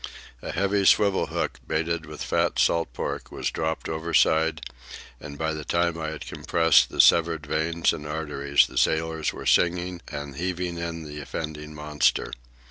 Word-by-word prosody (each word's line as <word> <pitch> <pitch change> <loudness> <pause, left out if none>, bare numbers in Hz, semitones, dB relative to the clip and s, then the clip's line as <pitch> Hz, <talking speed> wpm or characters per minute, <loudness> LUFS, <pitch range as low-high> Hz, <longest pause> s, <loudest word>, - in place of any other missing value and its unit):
A - - -5
heavy 100 +2 +1
swivel 100 -2 +4
hook, - - -3
baited 80 0 -1
with 75 0 -7
fat - - 0
salt 85 -6 +2
pork, - - -5
was - - -3
dropped 80 0 -3
overside; 80 0 +2 0.6
and 70 -1 -9
by 80 +1 -1
the 75 -1 -5
time 85 +2 0
I 80 -1 -4
had 80 -1 -7
compressed 80 -2 +3
the - - -9
severed 80 -2 +5
veins 80 +3 0
and 75 - -7
arteries, 75 -2 +1
the - - -2
sailors 80 0 0
were - - -9
singing 90 0 +2
and 70 -1 -6
heaving 90 0 -3
in 85 -1 -4
the 75 -1 -8
offending 75 +1 -6
monster. 75 -1 0
80 Hz, 160 wpm, -25 LUFS, 75-85 Hz, 0.6 s, severed